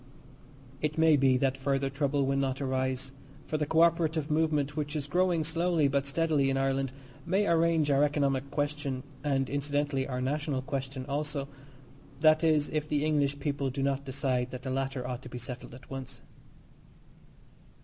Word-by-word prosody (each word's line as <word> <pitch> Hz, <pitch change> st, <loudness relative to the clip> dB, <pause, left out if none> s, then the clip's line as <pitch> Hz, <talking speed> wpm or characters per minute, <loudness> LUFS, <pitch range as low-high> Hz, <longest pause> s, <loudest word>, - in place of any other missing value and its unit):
It 150 Hz, 0 st, -1 dB
may 160 Hz, -1 st, +6 dB
be 135 Hz, -2 st, +4 dB
that 135 Hz, 0 st, +1 dB
further 135 Hz, 0 st, 0 dB
trouble 140 Hz, 0 st, +1 dB
will 135 Hz, +1 st, +1 dB
not 135 Hz, -1 st, 0 dB
arise, 130 Hz, -1 st, -1 dB, 0.3 s
for 155 Hz, -, -2 dB
the 150 Hz, -1 st, -1 dB
co 160 Hz, +2 st, +3 dB
operative 165 Hz, -2 st, +1 dB
movement, 150 Hz, -2 st, +1 dB
which 150 Hz, -1 st, -3 dB
is 145 Hz, -2 st, -2 dB
growing 175 Hz, +2 st, +2 dB
slowly 165 Hz, -1 st, +2 dB
but 140 Hz, 0 st, 0 dB
steadily 150 Hz, -2 st, +2 dB
in 135 Hz, -, +1 dB
Ireland, 135 Hz, -1 st, 0 dB, 0.3 s
may 190 Hz, +4 st, +1 dB
arrange 165 Hz, -3 st, +3 dB
our 140 Hz, +1 st, +4 dB
economic 140 Hz, -2 st, +1 dB
question, 145 Hz, -2 st, -2 dB, 0.2 s
and, 135 Hz, -2 st, +1 dB
incidentally, 145 Hz, -1 st, -1 dB
our 125 Hz, -2 st, -3 dB
national 140 Hz, 0 st, -1 dB
question 135 Hz, -1 st, -4 dB
also 145 Hz, 0 st, -2 dB, 0.7 s
that 155 Hz, 0 st, +5 dB
is 155 Hz, -2 st, +3 dB
if 155 Hz, -1 st, -2 dB
the 150 Hz, 0 st, +1 dB
English 145 Hz, -2 st, +1 dB
people 140 Hz, -1 st, -1 dB
do 135 Hz, +1 st, -3 dB
not 140 Hz, 0 st, 0 dB
decide 130 Hz, -2 st, -1 dB
that 125 Hz, 0 st, -7 dB
the 130 Hz, -, -3 dB
latter 135 Hz, -1 st, -2 dB
ought 125 Hz, -1 st, -4 dB
to 125 Hz, -, -10 dB
be 125 Hz, -, -7 dB
settled 120 Hz, 0 st, -7 dB
at 130 Hz, -, -14 dB
once. 135 Hz, -1 st, -7 dB
140 Hz, 170 wpm, -30 LUFS, 135-150 Hz, 0.7 s, may